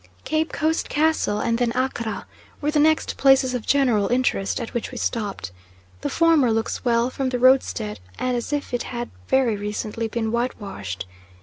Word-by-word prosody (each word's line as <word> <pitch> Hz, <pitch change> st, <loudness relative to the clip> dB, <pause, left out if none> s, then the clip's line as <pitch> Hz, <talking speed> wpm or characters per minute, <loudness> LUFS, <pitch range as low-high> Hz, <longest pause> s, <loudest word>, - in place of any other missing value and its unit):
Cape 315 Hz, +1 st, 0 dB
Coast 315 Hz, +2 st, 0 dB
Castle 305 Hz, -9 st, +1 dB
and 230 Hz, 0 st, 0 dB
then 240 Hz, -2 st, +1 dB
Accra 250 Hz, -4 st, -2 dB, 0.3 s
were 295 Hz, +1 st, 0 dB
the 300 Hz, -, +2 dB
next 315 Hz, +1 st, +2 dB
places 270 Hz, -1 st, +4 dB
of 245 Hz, -3 st, -4 dB
general 245 Hz, -8 st, +3 dB
interest 245 Hz, -5 st, 0 dB
at 230 Hz, -, -6 dB
which 235 Hz, -, -2 dB
we 250 Hz, -, -8 dB
stopped. 205 Hz, -, -3 dB, 0.5 s
The -, -, -2 dB
former 325 Hz, -7 st, +4 dB
looks 225 Hz, 0 st, -1 dB
well 240 Hz, 0 st, +2 dB
from 265 Hz, -1 st, -1 dB
the 250 Hz, -, -1 dB
roadstead, 250 Hz, -4 st, +2 dB, 0.2 s
and 255 Hz, -1 st, 0 dB
as 240 Hz, +3 st, -3 dB
if 290 Hz, -3 st, -2 dB
it 245 Hz, -, 0 dB
had 240 Hz, -1 st, -5 dB, 0.2 s
very 260 Hz, -4 st, +3 dB
recently 210 Hz, +2 st, -3 dB
been 225 Hz, 0 st, -2 dB
white 240 Hz, +2 st, -1 dB
washed. 100 Hz, -, -6 dB
245 Hz, 180 wpm, -23 LUFS, 225-270 Hz, 0.5 s, places